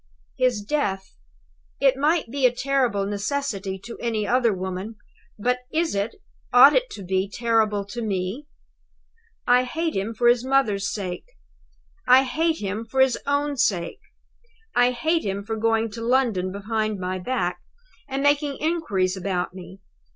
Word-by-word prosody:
"His 245 -5 +1
death! 200 -7 -2 0.6
It 270 -1 +4
might 300 -2 +1
be 270 -1 +3
a - - 0
terrible 245 -5 0
necessity 200 -2 -3
to 235 - -8
any 220 -3 -1
other 245 -1 +3
woman; 190 +3 -4 0.4
but 250 +4 0
is 330 +1 0
it, 200 +3 -2 0.4
ought 260 +4 +8
it - - +1
to 200 - -8
be 190 +1 -1
terrible 220 -3 +1
to 235 +4 -6
Me? 205 +6 -3 1.0
"I 250 +1 +5
hate 320 +6 -2
him 205 +4 -2
for 240 +2 +2
his 240 0 +4
mother's 260 -7 +1
sake. 185 -4 -5 0.8
I 255 +1 +7
hate 320 +5 0
him 205 +2 -3
for 245 +4 -4
his 265 -2 +4
own 285 0 0
sake. 175 -8 0 0.7
I 245 0 +4
hate 315 +7 0
him 200 0 -3
for 225 +2 -3
going 225 0 +1
to 230 - -7
London 230 -7 +1
behind 215 +1 -2
my 185 0 -3
back, 180 -4 -2 0.5
and 275 0 -3
making 285 -1 +2
inquiries 210 - 0
about 185 -1 -2
me. 190 +1 -11
230 Hz, 150 wpm, -24 LUFS, 195-265 Hz, 1.0 s, ought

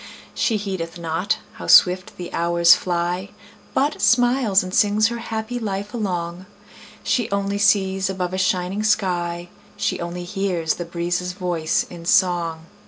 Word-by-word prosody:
She 225 - +1
heedeth 190 -5 -5
not 170 +4 -1 0.2
how - - -6
swift 185 0 +5
the 175 -1 -7
hours 170 0 +5
fly, 180 +1 -2 0.5
But 290 +3 0
smiles 240 -5 +3
and 185 0 -7
sings 210 +2 +3
her 235 0 -5
happy 225 +1 -4
life 205 -2 -4
along; 180 -4 -3 0.6
She 240 -3 0
only 200 0 -1
sees 195 -2 +2
above 185 -1 -3
a 185 - -2
shining 185 +2 0
sky; 175 -5 0 0.3
She 200 -2 -1
only 175 +1 -5
hears 180 -3 -1
the 175 - -6
breezes' 175 +1 -2
voice 175 -4 -1
in 170 -1 -11
song. 175 -4 +1
185 Hz, 145 wpm, -22 LUFS, 175-205 Hz, 0.6 s, swift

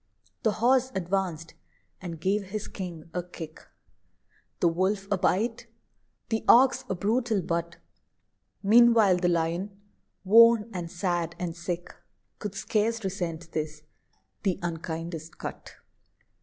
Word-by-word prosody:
The 220 - +2
Horse 260 +3 +2
advanced, 180 -3 -2 0.5
and 170 -3 -6
gave 195 +4 0
his 210 +2 -5
king 170 -4 -7
a 180 - -1
kick 165 -3 -10 1.0
The - - +3
Wolf 190 +4 0
a 200 - +3
bite 220 +6 0 0.6
the 225 -1 -1
Ox 260 +2 +6
a 190 - 0
brutal 220 +1 0
butt: 170 0 -2 0.9
Meanwhile 225 -3 +6
the 175 0 +1
Lion, 175 +4 -1 0.4
worn, 230 +2 +6
and 175 -2 -4
sad, 175 -2 -2
and 170 -2 -4
sick, 175 0 -5 0.5
Could 205 -2 -5
scarce 225 +2 0
resent 175 -3 -4
this, 155 -1 -4 0.6
the 190 -4 0
"unkindest 165 -1 -5
cut." - - -8
185 Hz, 120 wpm, -27 LUFS, 170-210 Hz, 1.0 s, Ox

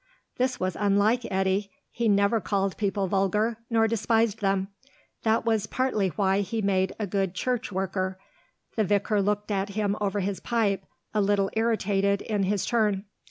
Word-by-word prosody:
This 255 0 0
was 185 -1 -1
unlike 210 +4 +2
Eddy; 190 +1 +1 0.2
he 235 -1 0
never 200 +2 +3
called 195 0 0
people 200 -1 0
vulgar, 205 +4 +1
nor 225 -1 +3
despised 225 0 +1
them; 195 -1 +1 0.5
that 225 0 +1
was 220 -2 +1
partly 250 -6 0
why 195 +2 +1
he 225 +3 -3
made 190 -2 +1
a 215 - -2
good 195 -1 -1
church 250 +2 -1
worker. 190 0 -2 0.6
The 220 - +2
vicar 205 +1 +1
looked 205 +1 -1
at 195 0 0
him 205 0 0
over 205 0 0
his 195 0 -2
pipe, 205 -5 0 0.3
a 210 - +2
little 200 -1 +2
irritated 200 -3 +1
in 210 -2 -1
his 200 0 0
turn. 210 -4 +1
205 Hz, 160 wpm, -27 LUFS, 195-220 Hz, 0.6 s, never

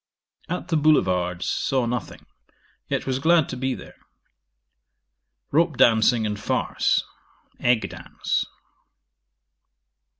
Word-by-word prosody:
'At 180 +1 -4
the 165 - +2
Boulevards 90 - +2
saw 130 -2 0
nothing, 120 -2 -4 0.6
yet - - -2
was 130 -1 -1
glad 160 +1 +4
to - - -4
be 130 +1 -2
there. - - -12 1.5
Rope 160 -2 +2
dancing 115 0 +4
and 105 -1 -3
farce. 100 - 0 0.6
Egg 120 -2 +2
dance. - - -3
125 Hz, 100 wpm, -24 LUFS, 110-155 Hz, 1.5 s, glad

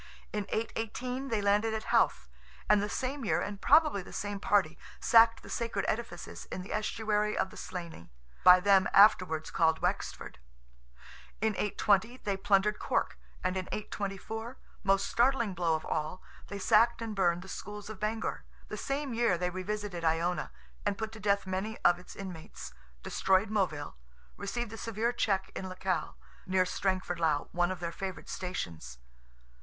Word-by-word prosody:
In 210 -2 -2
818 240 +4 -3
they 220 -5 -1
landed 210 +2 +2
at 220 - -3
Howth; - - +3 0.4
and 210 -1 +5
the 205 - -2
same 265 +4 -3
year, 175 -5 +1
and 200 +2 -4
probably 300 -8 +5
the - - -12
same 205 +1 -4
party, 195 -6 +2 0.2
sacked 230 -1 +5
the - - -11
sacred 230 -4 -2
edifices 220 -6 -4
in 185 - -6
the 195 - -6
estuary 215 0 0
of 190 - 0
the - - -12
Slaney, 170 - -7 0.3
by 180 0 +9
them 195 -1 +5
afterwards 185 -6 +5
called 160 -1 +3
Wexford; - - -2 1.0
in 220 +1 +1
820 210 +3 +1
they 200 -5 -2
plundered 195 +2 +2
Cork, - - -1 0.2
and 185 0 0
in 185 -1 -3
824—most 205 0 -3
startling 235 -4 +2
blow 170 -2 +1
of 155 - -4
all—they 160 +5 -5
sacked 225 +4 +4
and 220 -2 -4
burned 175 -2 +2
the - - -12
schools 205 +1 -7
of 215 -2 -8
Bangor. 220 +1 -2 0.3
The - - -5
same 275 -1 -2
year 230 -6 +2
they 180 +1 -1
revisited 185 -1 -4
Iona; 165 +2 0 0.3
and 205 -1 0
put 220 -1 -3
to 220 - -10
death 200 -1 +1
many 190 +4 -3
of 175 0 +5
its 180 - -12
inmates; 180 - -8 0.3
destroyed 190 +2 +2
Moville; 170 -9 -1 0.4
received 225 +3 -4
a - - -6
severe 230 +1 -1
check 195 -5 0
in 190 - -4
Lecale, 185 -3 -2 0.3
near 185 0 +3
Strangford 185 -2 -1
lough 155 -3 +1
(one 175 0 +1
of 185 -1 -4
their 170 -1 -3
favourite 190 +1 -6
stations). 85 - -5
200 Hz, 160 wpm, -31 LUFS, 180-220 Hz, 1.0 s, by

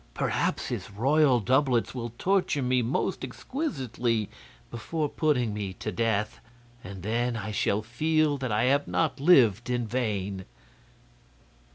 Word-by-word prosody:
Perhaps - - -1
his - - -4
royal 130 +5 +3
doublets 130 +2 +1
will 120 -2 -5
torture 185 -7 +1
me 125 0 +2
most 125 +10 -1
exquisitely 125 - -2 0.4
before 150 +7 -2
putting 135 -8 0
me 100 -2 -4
to - - -5
death, 110 -2 -1 0.4
and 95 -1 -9
then 115 +3 -1
I 110 0 -5
shall 105 0 0
feel 150 +5 +1
that 130 -3 -3
I 105 +2 +1
have 140 +3 +2
not 160 -3 0
lived 125 - +4
in 120 -1 0
vain." 100 -5 -2
120 Hz, 135 wpm, -27 LUFS, 110-145 Hz, 0.4 s, lived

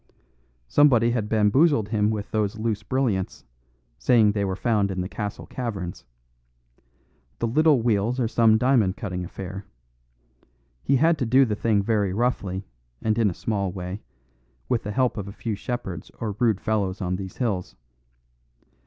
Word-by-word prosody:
Somebody 120 - +4
had 110 -3 -1
bamboozled 110 +2 +3
him 105 -1 +1
with 105 -2 -3
those 105 0 -1
loose 110 -1 -1
brilliants, 110 -4 -1 0.5
saying 110 - +4
they 100 -1 -1
were 95 -1 -1
found 105 -2 +1
in 95 -1 -2
the 90 - -3
castle 105 +1 -5
caverns. 100 -9 -5 1.3
The - - -1
little 145 +1 +3
wheels 115 +2 +1
are 120 - +1
some 115 -1 +4
diamond 115 -6 +2
cutting 90 -4 -4
affair. 95 +2 -7 1.2
He 140 - +2
had 160 +3 +3
to 125 - 0
do 130 +3 +5
the 105 -3 -1
thing 105 -1 +1
very 100 -3 +1
roughly 100 -4 -1 0.3
and 110 -1 0
in 110 -3 +4
a 85 - -6
small 100 -4 -2
way, 90 +2 -6 0.7
with 120 - +1
the 105 - -5
help 125 +3 +1
of 100 -1 -4
a - - -6
few 110 +2 -4
shepherds 100 -6 -5
or 110 -2 -2
rude 110 -5 +2
fellows 105 -4 -1
on 90 -2 -2
these 95 -1 -8
hills. 95 - -2
105 Hz, 160 wpm, -24 LUFS, 100-120 Hz, 1.3 s, do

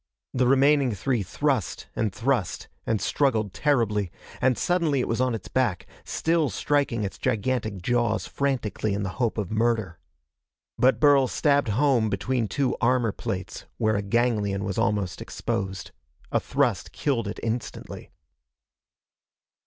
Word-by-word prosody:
The 125 -1 +2
remaining 135 -1 +4
three 120 +4 0
thrust 95 - -1
and 110 -3 0
thrust 115 -2 -1 0.2
and 110 -2 +1
struggled 110 -9 +1
terribly 105 - +1 0.3
and 130 -2 +3
suddenly 170 -6 +1
it - - 0
was 115 +2 0
on 130 -2 +1
its 110 - -7
back, 120 -9 0 0.2
still 165 -3 +1
striking 140 -6 0
its 100 - -5
gigantic 110 -5 -1
jaws 120 0 +1
frantically 115 -7 -1
in 100 - -2
the 95 - -2
hope 115 -2 +1
of 105 -3 -3
murder. 110 -6 0 0.8
But 130 +1 +4
Burl 145 -3 +5
stabbed 145 +1 +2
home 120 -1 +3
between 115 +3 -1
two 135 +4 0
armor 120 -2 +3
plates 95 -1 -5
where 110 0 +2
a 100 - 0
ganglion 105 -2 0
was 100 -2 -2
almost 100 -3 0
exposed. 95 -1 -4 0.4
A - - +3
thrust - - 0
killed 120 -7 -1
it 100 - -5
instantly. 115 0 -4
115 Hz, 140 wpm, -26 LUFS, 105-130 Hz, 0.8 s, Burl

